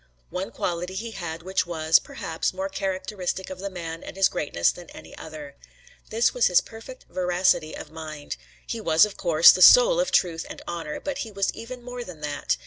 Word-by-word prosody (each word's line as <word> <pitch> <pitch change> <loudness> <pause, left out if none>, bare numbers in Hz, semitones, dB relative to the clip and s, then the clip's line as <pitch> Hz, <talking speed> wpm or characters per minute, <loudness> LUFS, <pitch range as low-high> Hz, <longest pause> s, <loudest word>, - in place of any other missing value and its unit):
One 185 +2 -3
quality 180 +2 -3
he 225 +4 -4
had 165 -5 -6
which 190 0 -1
was, 160 -2 +3
perhaps, 165 +3 -4
more 190 +1 -3
characteristic 190 -1 -3
of 185 - -7
the 200 +1 -4
man 165 -3 -6
and - - -10
his 195 - +4
greatness 145 - 0
than 175 -1 -12
any - - -12
other. 150 -3 -10 0.5
This 225 +2 +2
was 245 - +3
his 180 - +5
perfect 230 +3 -11
veracity 180 -3 +1
of - - -10
mind. 155 -2 -7 0.3
He 230 - -4
was, 165 0 +5
of 210 - -8
course, 170 -2 +7
the 185 - -1
soul - - +8
of - - +1
truth 165 -2 +2
and - - -8
honor, 165 -3 -5
but 285 - -4
he 225 - -4
was 195 -1 -1
even 245 +1 -9
more 245 0 -6
than 175 -8 -11
that. 145 - -2
180 Hz, 200 wpm, -25 LUFS, 160-205 Hz, 0.5 s, soul